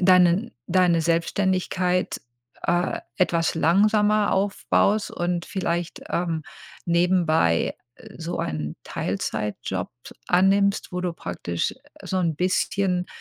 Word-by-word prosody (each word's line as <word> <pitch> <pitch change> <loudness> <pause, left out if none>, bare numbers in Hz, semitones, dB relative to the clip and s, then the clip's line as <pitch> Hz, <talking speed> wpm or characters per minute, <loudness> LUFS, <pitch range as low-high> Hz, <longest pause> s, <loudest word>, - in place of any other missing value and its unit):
deinen 185 +4 +4
deine 175 -2 +3
Selbstständigkeit, 180 +2 0 0.4
äh, 175 +1 0 0.2
etwas 170 -3 +1
langsamer 210 +5 +3
aufbaust 200 +1 +1
und 175 0 -2
vielleicht, 175 -3 -3
ähm, 170 -2 -1 0.4
nebenbei 170 - +2 0.4
so 170 +1 -4
einen 75 -1 -3
Teilzeitjob 100 -3 -3 0.4
annimmst, 195 +2 +3
wo 180 - -2
du 180 -1 -2
praktisch 85 - -3 0.3
so 190 - -2
'n 170 -3 +1
bisschen, 180 0 0
180 Hz, 95 wpm, -24 LUFS, 170-190 Hz, 0.4 s, deinen